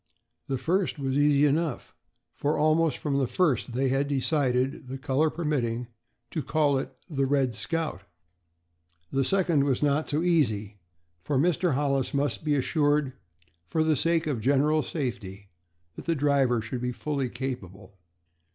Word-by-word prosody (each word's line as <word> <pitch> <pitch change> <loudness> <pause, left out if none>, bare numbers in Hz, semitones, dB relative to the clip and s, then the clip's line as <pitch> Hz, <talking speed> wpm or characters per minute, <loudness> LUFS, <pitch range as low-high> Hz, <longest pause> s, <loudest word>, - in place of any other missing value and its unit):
The 135 - -1
first 175 +7 0
was 135 -2 -2
easy 145 0 +4
enough, 150 -1 -1 0.4
for 145 +2 -1
almost 155 +1 +2
from 140 -2 -1
the 135 - +1
first 130 -7 0
they 130 +2 +1
had 135 +2 +1
decided, 135 -1 0
the 130 +1 -5
color 140 +3 +1
permitting, 125 -8 -2 0.4
to 155 - -2
call 145 -3 +1
it 135 - -5 0.2
the 135 -5 -1
"Red 135 -3 +1
Scout." 160 - -3 1.1
The 135 - +1
second 170 -3 +2
was 140 0 0
not 145 +1 +1
so 150 +3 0
easy, 110 - +1 0.4
for 140 +10 -2
Mr. 170 +1 +2
Hollis 140 -1 0
must 140 +2 0
be 150 -1 +1
assured, 145 0 +1 0.5
for 155 - 0
the 155 -1 +2
sake 165 +3 +1
of 145 -5 -1
the - - -6
general 145 +5 +3
safety, 110 - -5 0.4
that - - -9
the 165 - +2
driver 135 -5 +2
should 120 +2 -5
be 125 0 -1
fully 140 0 -2
capable. 100 -7 -6
140 Hz, 155 wpm, -27 LUFS, 130-155 Hz, 1.1 s, easy